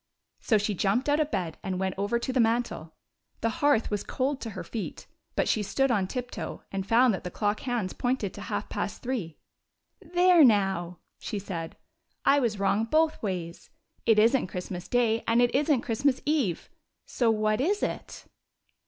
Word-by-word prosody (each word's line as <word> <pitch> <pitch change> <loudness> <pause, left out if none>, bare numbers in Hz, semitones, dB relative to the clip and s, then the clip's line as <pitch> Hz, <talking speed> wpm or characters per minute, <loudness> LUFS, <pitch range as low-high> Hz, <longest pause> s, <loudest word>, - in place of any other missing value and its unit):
So 220 - +2
she 210 0 -1
jumped 205 - +1
out 290 +1 +3
of 305 -1 +1
bed 180 - -3
and 185 -1 -3
went 190 -1 -1
over 200 +4 0
to 245 +2 -3
the 255 - +1
mantel. 225 -9 0 0.5
The 230 - +1
hearth 285 -8 +3
was 205 -1 -1
cold 270 +1 -2
to 230 - -4
her - - -4
feet, 220 -4 -6 0.3
but - - +1
she 215 - +2
stood 270 +6 +1
on 200 -5 +1
tiptoe, 250 +4 -5
and 195 0 -3
found 240 +1 +5
that 190 - -4
the 180 - -4
clock 205 +3 -1
hands 240 -7 -2
pointed 245 -6 -1
to - - -9
half - - -3
past - - -4
three. 225 -11 -3 0.4
" - - -52 0.2
There, 355 -2 +6
now!" 195 -7 +2 0.2
she 215 - -4
said, 170 -5 -6 0.5
"I 285 - +5
was 230 -6 0
wrong 200 +2 +1
both 315 +5 +2
ways. 180 -5 -4 0.4
It 225 -2 +5
is 225 +5 +5
n't 245 - 0
Christmas 180 0 -6
day, 230 -2 +1
and 230 +1 +3
it 245 0 +3
is 290 +3 +1
n't 270 -4 +2
Christ 235 -2 -3
mas 280 -3 +3
eve! 280 - 0 0.3
So 240 -3 +1
what 215 +1 +1
is 405 +8 +1
it?" - - -4
225 Hz, 195 wpm, -27 LUFS, 195-255 Hz, 0.5 s, There